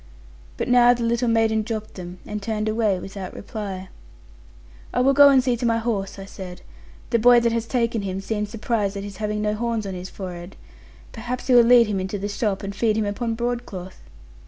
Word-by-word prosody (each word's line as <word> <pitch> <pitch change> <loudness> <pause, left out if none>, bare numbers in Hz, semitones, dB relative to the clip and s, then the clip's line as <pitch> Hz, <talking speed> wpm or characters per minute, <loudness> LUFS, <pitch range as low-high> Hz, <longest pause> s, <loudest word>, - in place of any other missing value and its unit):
But - - -2
now 245 0 +6
the 240 - -4
little 235 +1 +1
maiden 225 -1 +2
dropped 215 0 -5
them, 180 -1 -8
and 210 0 -5
turned 215 +1 -2
away, 215 -3 +1
without 190 0 -7
reply. 195 -3 -6 1.1
'I 250 - +3
will 270 +2 +4
go 285 +1 +8
and 265 -2 +5
see 250 -2 +1
to 235 - -6
my 230 0 +2
horse,' 220 -5 -2
I 195 - -8
said; 185 -2 -9 0.5
'the 235 - +3
boy 245 +2 +7
that 235 0 +2
has 230 0 -2
taken 230 -3 0
him 190 -1 -3
seemed 210 +1 -3
surprised 210 -2 -1
at 200 - -5
his 200 -2 -8
having 210 0 -2
no 210 0 +1
horns 230 0 -2
on 195 - -4
his 180 +1 -7
forehead. 180 -1 -8 0.6
Perhaps 245 +2 -5
he 260 - +2
will 240 - +9
lead 235 0 +6
him 205 -3 -2
into 190 +2 -3
the 200 +1 -3
shop, 205 -1 -2
and 195 0 -4
feed 215 0 +1
him 220 - +1
upon 225 +3 -2
broadcloth.' 235 -6 -4
215 Hz, 210 wpm, -23 LUFS, 195-235 Hz, 1.1 s, will